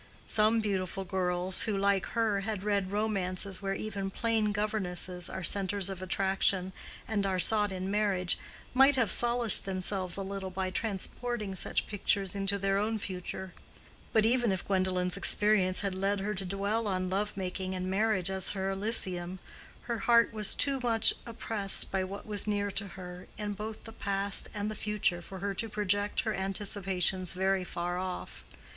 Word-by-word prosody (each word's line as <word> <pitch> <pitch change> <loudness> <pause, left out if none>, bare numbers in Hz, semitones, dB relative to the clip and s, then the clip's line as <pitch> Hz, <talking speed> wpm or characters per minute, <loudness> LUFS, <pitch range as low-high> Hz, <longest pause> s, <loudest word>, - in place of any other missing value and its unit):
Some 220 +1 +3
beautiful 195 -2 -2
girls 180 -1 0
who, 205 - 0
like 195 -1 +2
her, 220 -3 +2
had 200 -1 -3
read 200 -2 0
romances 200 -2 -1
where 195 -1 -1
even 200 -2 -4
plain 220 0 +1
governesses 185 -4 -2
are 190 - -5
centres 195 +1 +1
of 190 -1 -7
attraction 190 0 +1 0.3
and 210 -2 0
are 190 -1 0
sought 210 +2 +4
in 190 +1 -3
marriage, 200 -4 +1 0.3
might 270 +2 +6
have 230 -7 +1
solaced 240 -3 +6
themselves 185 -1 +1
a 195 - -2
little 195 0 -4
by 185 0 -3
transporting 215 +1 -3
such 190 - 0
pictures 200 -2 0
into 200 0 0
their 195 0 +1
own 220 +2 0
future; 190 -1 -5 0.6
but 220 -1 +4
even 240 -1 +3
if 190 -2 -2
Gwendolen's 185 -1 +1
experience 195 -2 +3
had 200 -2 -1
led 195 +2 0
her 205 +2 -2
to 190 -1 -4
dwell 200 +4 -1
on 185 -2 -1
love 205 +2 -1
making 185 0 -3
and 185 0 -3
marriage 195 -1 +1
as 190 0 -1
her 195 -1 -1
elysium, 190 -3 -2 0.5
her 235 -2 -3
heart 235 +1 +4
was 210 -2 +1
too 275 -1 +3
much 230 -3 +3
oppressed 220 -3 0
by 190 -1 0
what 195 +2 -7
was 210 -1 -1
near 205 -1 0
to 200 - -3
her, 180 -1 -9
in 210 -1 -3
both 215 +2 -6
the 225 - -9
past 200 -2 -1
and 210 0 -3
the - - -4
future, 210 -4 -1
for 190 +2 -9
her 200 +2 -2
to 225 +3 -3
project 205 0 0
her 220 -2 -1
anticipations 190 -2 -1
very 190 0 +1
far 175 0 -3
off. 185 -1 -5
195 Hz, 170 wpm, -30 LUFS, 185-210 Hz, 0.6 s, might